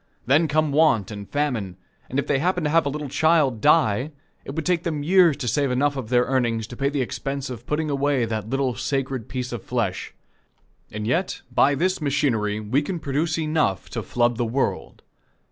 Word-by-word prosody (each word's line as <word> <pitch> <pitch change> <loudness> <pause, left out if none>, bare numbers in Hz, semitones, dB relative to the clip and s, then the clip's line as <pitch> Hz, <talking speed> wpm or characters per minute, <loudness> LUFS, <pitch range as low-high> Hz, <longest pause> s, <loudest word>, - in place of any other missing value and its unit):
Then 145 +6 +4
come 155 0 +1
want 140 - +3
and 100 -1 -8
famine, 125 -11 -2 0.3
and 130 - -3
if 140 - +1
they 140 - +1
happen 180 +2 0
to 150 - 0
have 165 -2 +3
a - - +1
little 150 +1 -4
child 145 -4 +2
die, 145 -3 +3 0.3
it 135 - -7
would 160 - -3
take 180 -2 +1
them 155 -4 -3
years 175 -2 +5
to 135 -4 -4
save 140 +4 +1
enough 140 +3 +1
of 130 -5 -5
their 125 -1 +4
earnings 120 -4 0
to 120 - -9
pay 140 +2 0
the 140 -2 -1
expense 135 +2 -4
of 120 - -9
putting 155 +1 -1
away 140 -3 +1
that 110 -1 -4
little 135 -1 0
sacred 130 -1 -3
piece 125 -1 -4
of 120 -4 -5
flesh. - - -3 0.8
And 105 0 -5
yet, 170 - -1
by 140 +1 +4
this 185 +4 0
machinery 130 -8 0
we 110 +7 0
can 175 +5 -4
produce 155 +2 -1
enough 155 - 0
to - - -3
flood 120 -1 0
the 120 - 0
world. 125 +4 -2
140 Hz, 200 wpm, -23 LUFS, 120-150 Hz, 0.8 s, years